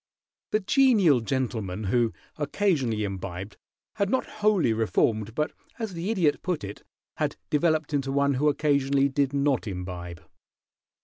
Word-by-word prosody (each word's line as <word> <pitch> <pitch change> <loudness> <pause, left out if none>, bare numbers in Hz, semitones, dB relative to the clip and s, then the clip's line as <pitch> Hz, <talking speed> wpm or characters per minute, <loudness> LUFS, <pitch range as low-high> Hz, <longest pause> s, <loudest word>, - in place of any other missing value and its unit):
The 215 - +1
genial 205 - +4
gentleman 110 -6 -2
who 115 +3 +2 0.3
occasionally 145 - 0
imbibed 95 0 -5 0.4
had 200 -2 +1
not 260 +3 +1 0.2
wholly 205 - +3
reformed, 110 0 0
but, 150 0 0 0.3
as 220 -5 -4
the 170 +4 -3
Idiot 175 -9 +2
put 180 - -2
it, 100 +1 -7 0.4
had - - -1 0.2
developed 155 0 +1
into 135 -1 0
one 140 0 +2
who 145 +3 +2
occasionally 140 -2 +2
did 140 0 +1
not 140 -3 +1
imbibe. 90 -3 -6
140 Hz, 135 wpm, -26 LUFS, 110-160 Hz, 0.4 s, genial